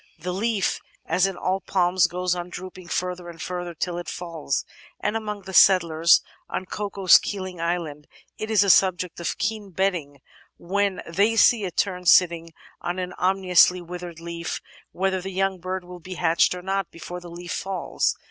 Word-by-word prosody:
The 180 +3 -4
leaf, 210 +1 0 0.3
as 180 +4 +2
in 190 -2 -5
all 185 +2 0
palms, 180 0 +2
goes 180 0 -1
on 175 0 -5
drooping 185 0 -9
further 180 0 -3
and 165 -1 -11
further 175 0 -5
till 175 +2 -3
it 175 - -6
falls, 165 -6 -3 0.3
and 210 - -1
among 210 -2 -4
the 190 0 -9
settlers 170 -4 +6 0.3
[on 185 - -3
Cocos 200 -1 +4
Keeling 185 -4 -5
Island] 165 -4 -3 0.3
it 215 - -4
is 215 -3 +4
a 200 - +6
subject 180 -2 +2
of 170 - -3
keen 215 -2 -2
betting, 175 -6 -1 0.4
when 200 +2 -1
they 200 +7 +2
see 225 -2 +5
a 180 - -3
tern 180 -1 -1
sitting 170 -2 +4 0.3
on 175 +1 -3
an 180 -1 -4
ominously 180 -1 +4
withered 175 -1 -8
leaf, 170 0 -5 0.3
whether 190 0 -1
the 190 0 -6
yoimg 195 -2 0
bird 185 +1 -3
will 180 0 -10
be 185 +2 -8
hatched 170 +1 +2
or 180 - -8
not 195 -1 -1
before 175 +2 -8
the 175 -1 -11
leaf 175 +1 -8
falls. 190 -3 -1
180 Hz, 175 wpm, -24 LUFS, 175-190 Hz, 0.4 s, settlers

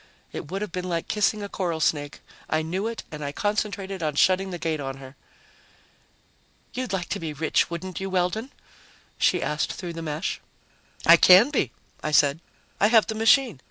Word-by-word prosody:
It 145 - -7
would 195 +2 -3
have 210 - -6
been 180 +1 -4
like 170 -1 -2
kissing 210 0 0
a - - -4
coral 175 -5 -3
snake. 145 -2 -1 0.3
I 155 0 +1
knew 185 +7 -2
it 230 0 -5
and 150 -1 -6
I 140 - -3
concentrated 200 +1 -2
on 155 -2 -1
shutting 190 +5 +3
the 180 - -5
gate 160 -2 -2
on 135 -1 -5
her. 135 0 -12 1.6
"You'd 255 -2 -4
like 185 -3 -2
to - - -2
be 160 -2 -5
rich, 155 +2 +1
wouldn't 170 +2 -5
you, 195 0 -4
Weldon?" 190 +7 -1 0.7
she 180 - +2
asked 150 +2 -1
through 175 -2 -6
the 165 - -6
mesh. 155 +1 -3 0.6
"I - - +9
can 190 +9 +7
be," 150 - 0 0.3
I - - -2
said. 145 0 +3 0.4
"I 205 - +5
have 220 -1 +5
the 220 - -3
machine. 225 - +3
180 Hz, 190 wpm, -25 LUFS, 155-205 Hz, 1.6 s, I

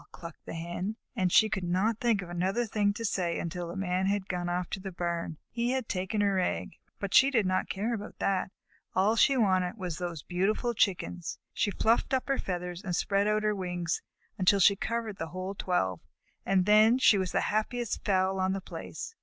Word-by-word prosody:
clucked 170 -2 -10
the - - -5
Hen. 175 +5 -4 0.2
And 185 -5 +1
she 220 - +6
could 190 -3 -3
not 190 +6 +1
think 225 -5 +1
of 175 - -10
another 190 +7 0
thing 205 -2 +1
to 230 +2 -4
say 175 -4 0
until 175 +1 -4
the 170 - -6
Man 190 0 0
had 200 -1 0
gone 175 -1 -2
off 175 0 -1
to 195 - -3
the 190 0 -6
barn. 170 -2 -3
He 240 +1 0
had 260 -3 -2
taken 190 +3 -1
her 200 -2 +2
egg, 180 - -1 0.3
but 200 -1 -4
she 270 - +7
did 230 -7 +2
not 185 0 0
care 215 +5 -1
about 210 -2 -6
that. 190 -1 0 0.4
All 200 +4 +3
she 270 +4 +4
wanted 185 -4 +2
was 180 -5 -4
those 175 -4 -4
beautiful 205 +7 0
Chickens. 180 -5 -1 0.2
She - - +1
fluffed 225 +6 +2
up 255 -1 -2
her 275 - +1
feathers 180 -1 -4
and 180 -3 -2
spread 200 +3 +1
out 215 0 +1
her 210 0 +2
wings 180 -3 -2 0.4
until 195 +2 +4
she 200 +2 +6
covered 225 0 -3
the 165 - -3
whole 185 +3 -5
twelve, 135 - -1 0.5
and 190 -2 +3
then 215 +3 +6
she 215 -6 +5
was 185 -3 -1
the - - +1
happiest 235 +2 -1
fowl 190 -1 +1
on 190 0 +1
the 195 - -2
place. 455 - -7
190 Hz, 210 wpm, -29 LUFS, 180-215 Hz, 0.5 s, she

